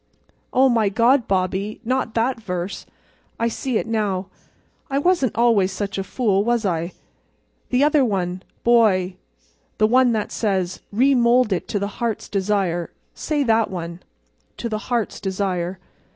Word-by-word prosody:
"Oh, 265 +1 +5
my 225 -5 +2
God, 235 +5 +3
Bobbie—not 210 +6 -1
that 235 +1 0
verse—I 185 +4 -6
see 235 +1 -1
now. 205 -4 -2 0.6
I 275 - 0
wasn't 285 - +2
always 225 -5 +3
such 195 +1 -3
a - - -1
fool, 200 -3 +1
was 235 -1 +1
I? 170 -1 -1 0.8
The 255 +2 +3
other 300 -1 +4
one, 185 -5 -1 0.2
boy—the 195 -6 +3 0.7
one 250 +1 +4
that 215 -2 -2
says: 190 -5 -1
'Remould 245 -1 +3
it 180 - -3
to - - -2
the 200 0 -4
Heart's 230 -3 -2
Desire.' 190 -4 0 0.2
Say 295 -2 -1
that 225 -3 +2
one—'to 175 +6 -9
the 215 -1 -2
Heart's 235 -3 -1
Desire. 185 -2 -2
215 Hz, 130 wpm, -22 LUFS, 190-240 Hz, 0.8 s, Oh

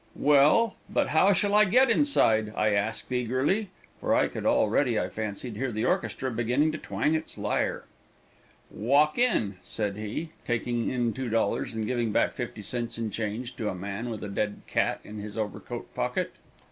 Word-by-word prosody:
"Well, 150 +10 +4
but - - +1
how 160 +6 +4
shall 205 +1 +1
I 210 0 +7
get 240 +5 +4
inside?" 110 - +4
I 105 - +2
asked 105 +4 0
eagerly, 130 - 0 0.3
for - - +1
I - - +3
could - - -4
already, 115 +2 +2
I - - -2
fancied, 110 +2 -5
hear 130 +1 -2
the 110 0 -2
orchestra 125 +4 -1
beginning 125 +7 +1
to 155 - -5
twang 150 - -1
its 160 0 -2
lyre. - - -1 0.9
"Walk 145 - +2
in," 110 - +2
said 100 +2 -2
he, 110 +10 -4
taking 120 0 -1
in 120 -3 0
$2 115 -2 -1
and 110 -1 -2
giving 120 -1 -1
back - - +2
50 105 - -6
cents 120 +2 -3
in 115 -2 -3
change 115 +4 -4
to 105 - -2
a - - -4
man 100 +6 -5
with 110 -3 -5
a - - -4
dead 105 +1 -3
cat - - 0
in 105 0 -9
his 105 +1 -7
overcoat 105 -2 -5
pocket. - - -2
120 Hz, 175 wpm, -27 LUFS, 105-145 Hz, 0.9 s, I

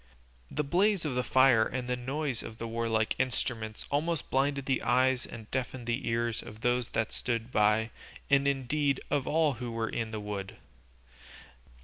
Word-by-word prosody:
The 150 - -1
blaze 185 +4 +2
of 145 - -1
the 125 0 0
fire 130 -4 +5
and 125 +2 -3
the 125 - 0
noise 130 +1 -2
of 110 - -8
the 115 - -4
warlike 115 -1 0
instruments 115 -4 -1
almost 155 +2 -1
blinded 140 0 +1
the 135 -1 +1
eyes 130 +1 +2
and 115 -2 -9
deafened 130 -1 -3
the 120 +2 -2
ears 115 0 0
of 110 +1 -11
those 125 -1 +1
that 110 -1 0
stood 115 -1 -2
by, 105 +1 +3 0.4
and 140 0 +4
indeed 140 +1 +1
of 140 -3 +1
all 155 -2 +3
who 120 -1 -3
were 115 -1 -2
in 115 -2 -2
the 110 -1 -4
wood. 100 -2 -5
125 Hz, 170 wpm, -30 LUFS, 115-140 Hz, 0.4 s, fire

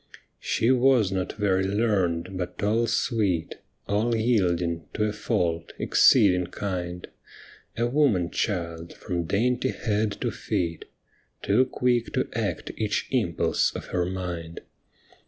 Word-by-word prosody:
She 115 - 0
wa^ 125 -5 +4
not 95 -1 -2
very 95 -3 +1
learned, 95 -4 0
but 90 +1 -5
all 115 +3 +2
sweet, 100 -11 0 0.3
All 110 +4 +1
yielding, 90 -8 +1
to 105 - 0
a 105 -1 0
fault 85 -7 -1
— - - -30
exceeding 90 -8 +4
kind. 90 -2 -4 0.7
A 115 - +1
woman 120 - +2
child 85 -5 -3
from 85 -3 -3
dainty 125 +8 +1
head 105 -3 -1
to - - 0
feet, 85 -2 -3 0.6
Too 115 +6 +3
quick 120 -3 0
to - - 0
act - - -2
each - - -1
impulse - - +1
of - - -7
her 90 -1 +1
mind. 90 -3 -5
100 Hz, 130 wpm, -26 LUFS, 90-115 Hz, 0.7 s, wa^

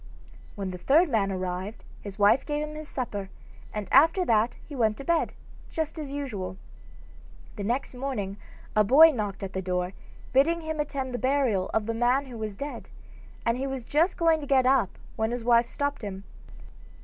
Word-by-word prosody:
When 195 -2 -4
the 180 - -7
third 315 - +4
man 205 -6 +1
arrived 185 +2 -4 0.2
his 200 -2 -8
wife 205 +5 +5
gave 295 0 -2
him 305 - -8
his 305 0 -7
supper, 205 -9 -4 0.4
and 210 -2 -4
after 330 +7 +5
that 225 -2 +2
he 290 - -8
went 220 -4 +1
to - - -7
bed, 335 +2 +1 0.4
just 320 0 -3
as 295 -3 -5
usual. 215 -11 -4 1.0
The 205 - -5
next 240 +7 -1
morning 245 -7 -3 0.4
a 215 - +5
boy 295 +10 +8
knocked 210 -6 -4
at 190 - -5
the 190 - -2
door, 180 0 -2 0.4
bidding 325 +6 +3
him 315 -1 -4
attend 275 -3 -2
the 245 - -2
burial 255 -8 +1
of 220 -1 0
the 230 - -1
man 245 +4 +2
who 250 -3 -9
was 215 -2 -4
dead, 285 +1 -6 0.6
and 230 +2 +1
he 270 - -1
was 265 -2 -4
just 320 +9 +1
going 330 -2 +3
to 285 - -6
get 265 -2 +4
up 260 -7 +2 0.2
when 220 0 +1
his 240 0 -3
wife 235 0 +4
stopped 285 -2 -2
him. 195 -2 -6
245 Hz, 190 wpm, -27 LUFS, 205-285 Hz, 1.0 s, boy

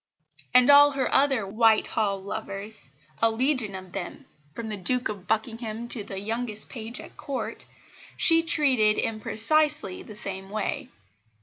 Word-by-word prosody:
And 250 +2 +7
all 290 0 +8
her 270 -1 -1
other 270 -6 +3
Whitehall 215 -1 +1
lovers 200 -4 -6 0.3
a 225 - +5
legion 240 -3 -1
of 185 -1 -9
them, 185 -2 -7 0.3
from 225 +7 -7
the 215 - -3
Duke 250 +6 +1
of 200 -4 -7
Buckingham 225 +1 -3
to 225 -4 -2
the 195 -1 -7
youngest 220 +1 0
page 230 -1 -6
at - - -12
Court, 275 -2 -5 0.5
she 330 -1 +4
treated 260 -10 +3
in 220 -1 -2
precisely 295 -3 +1
the 215 - -11
same 195 -2 -6
way. 215 +1 -3
220 Hz, 145 wpm, -26 LUFS, 205-255 Hz, 0.5 s, all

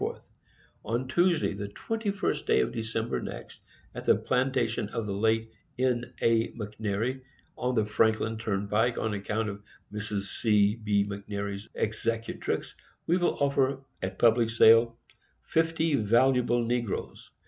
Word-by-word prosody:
On 120 +4 -2
TUESDAY, 175 - +2
the 100 +1 -5
21st 200 - -2
day - - +4
of - - -1
December 115 0 -2
next, - - -8 0.3
at - - -6
the - - +5
Plantation 125 -4 0
of 115 0 -3
the 100 - -3
late 110 +2 +1 0.3
N. 125 -1 0
A. 115 -1 +3
MCNAIRY, 110 +3 -3 0.3
on 125 0 -1
the 110 -2 +2
Franklin 110 +1 +1
Turnpike, 110 +2 0
on 110 -1 -1
account 105 +2 -2
of 100 0 -7 0.3
Mrs. 105 -1 -3 0.2
C. 105 -2 +4
B. 105 -3 +1
McNairy, 100 0 -5
Executrix, 115 +1 -2 0.3
we 175 - +2
will 175 - +1
offer 135 -1 +1 0.2
at 95 0 -4
Public 115 -1 +4
Sale 115 +1 +5 0.5
FIFTY 165 -1 +1
VALUABLE 120 +2 +3
NEGROES. 120 -3 -3
115 Hz, 130 wpm, -28 LUFS, 105-125 Hz, 0.5 s, the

